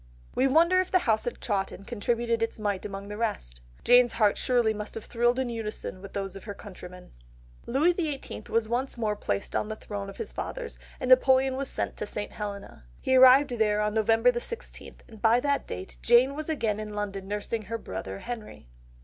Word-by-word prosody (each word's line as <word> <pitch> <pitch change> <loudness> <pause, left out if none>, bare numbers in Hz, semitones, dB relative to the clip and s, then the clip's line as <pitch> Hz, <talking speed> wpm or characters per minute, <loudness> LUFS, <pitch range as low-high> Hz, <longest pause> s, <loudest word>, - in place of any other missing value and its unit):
We 260 - +3
wonder 335 +6 +5
if 370 - -4
the 370 - +4
household 235 -6 0
at - - -23
Chawton 200 -2 -2
contributed 235 +1 -1
its 225 - -1
mite 205 -2 -2
among 195 0 -7
the 210 0 -6
rest? - - -3 0.2
Jane's 245 -1 +6
heart 210 -3 +3
surely 240 -3 +2
must 210 0 -7
have 225 - -6
thrilled 240 +1 +1
in 260 -1 0
unison 220 -5 -5
with 200 - -10
those 195 -1 -4
of 195 - -10
her 205 -2 -6
countrymen! 180 -3 -11 0.6
Louis 285 +8 +3
XVIII. 310 -6 -4
was 225 -1 +1
once 245 +3 -1
more 215 -2 0
placed 100 - -3
on - - 0
the 215 - -3
throne 205 -2 -6
of - - -10
his 455 - -5
fathers, 485 -2 -6 0.2
and 255 - -3
Napoleon 260 +1 +5
was 270 0 -3
sent - - -3
to 210 - -4
St. 205 0 -5
Helena. 200 - -7
He 260 - +1
arrived 260 +2 +7
there 215 -3 +1
on 210 0 0
November 225 +2 +4
the 240 - -2
sixteenth, 465 - -7
and 220 -3 -14
by 230 +2 +5
that 280 +2 0
date 90 +1 -7
Jane 240 +3 +5
was 310 +2 -5
again 225 -9 0
in 210 -1 -6
London 200 -2 -4
nursing 210 +2 -3
her 230 +4 -3
brother 95 - -6
Henry. 230 - -7
225 Hz, 205 wpm, -28 LUFS, 205-255 Hz, 0.6 s, arrived